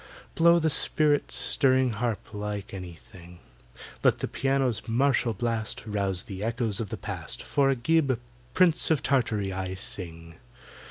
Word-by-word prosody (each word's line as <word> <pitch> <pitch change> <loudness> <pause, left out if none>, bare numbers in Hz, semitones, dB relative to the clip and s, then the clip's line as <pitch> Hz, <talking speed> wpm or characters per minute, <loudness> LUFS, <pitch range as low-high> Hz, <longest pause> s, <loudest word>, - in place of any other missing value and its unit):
Blow 170 +1 +5
the 160 -2 +1
spirit 150 0 +2
stirring 130 -2 +3
harp 110 -1 -3
like 105 -1 -5
anything! 90 -1 -11 0.7
Let - - +4
the - - -3
piano's 135 -4 -1
martial 120 -1 +1
blast 115 -3 -3
Rouse 100 -3 -1
the 100 -3 -7
Echoes 115 -2 0
of 110 -4 -4
the - - -5
Past, - - -6
For 140 -1 +1
of 135 - +1
AGIB, 155 -5 +2 0.4
Prince 175 -3 +4
of 160 -4 +1
Tartary, 115 -7 0
I 95 0 -4
sing! 85 -4 -3
115 Hz, 145 wpm, -27 LUFS, 100-135 Hz, 0.7 s, Blow